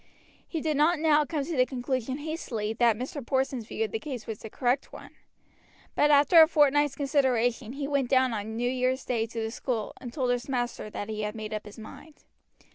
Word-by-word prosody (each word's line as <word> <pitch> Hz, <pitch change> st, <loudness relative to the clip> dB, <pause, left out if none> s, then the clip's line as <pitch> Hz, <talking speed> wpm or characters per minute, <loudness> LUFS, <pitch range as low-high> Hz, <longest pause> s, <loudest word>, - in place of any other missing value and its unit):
He 325 Hz, -, -3 dB
did 310 Hz, -2 st, 0 dB
not 320 Hz, +4 st, +4 dB
now 300 Hz, -1 st, +3 dB
come 290 Hz, -2 st, -2 dB
to 335 Hz, -, -4 dB
the 255 Hz, -, +5 dB
conclusion 255 Hz, 0 st, -3 dB
hastily 290 Hz, -9 st, -4 dB
that 230 Hz, -1 st, +3 dB
Mr. 260 Hz, +3 st, -5 dB
Porson's 260 Hz, -2 st, -1 dB
view 225 Hz, -, -2 dB
of 215 Hz, -, -7 dB
the 225 Hz, -, -2 dB
case 250 Hz, -2 st, -6 dB
was 220 Hz, -2 st, -6 dB
the 220 Hz, -, -8 dB
correct 250 Hz, +4 st, -1 dB
one; -, -, -11 dB, 0.8 s
but 295 Hz, -, +3 dB
after 295 Hz, +3 st, +7 dB
a 320 Hz, -, +8 dB
fortnight's 290 Hz, -2 st, +3 dB
consideration 255 Hz, -5 st, +1 dB
he 280 Hz, 0 st, -4 dB
went 280 Hz, -3 st, 0 dB
down 260 Hz, -2 st, +3 dB
on 220 Hz, +1 st, -4 dB
New 240 Hz, +2 st, -1 dB
Year's 255 Hz, +1 st, 0 dB
Day 230 Hz, -2 st, -1 dB
to 230 Hz, 0 st, -6 dB
the 220 Hz, 0 st, -2 dB
school, 230 Hz, -3 st, -3 dB
and 245 Hz, -, -7 dB
told 255 Hz, -2 st, 0 dB
his 245 Hz, +2 st, -2 dB
master 245 Hz, -4 st, -2 dB
that 205 Hz, -, -5 dB
he 215 Hz, -1 st, -4 dB
had 210 Hz, +1 st, -3 dB
made 215 Hz, -1 st, -6 dB
up 215 Hz, 0 st, -5 dB
his 205 Hz, -, -12 dB
mind. 290 Hz, +7 st, -12 dB
255 Hz, 215 wpm, -28 LUFS, 225-285 Hz, 0.8 s, a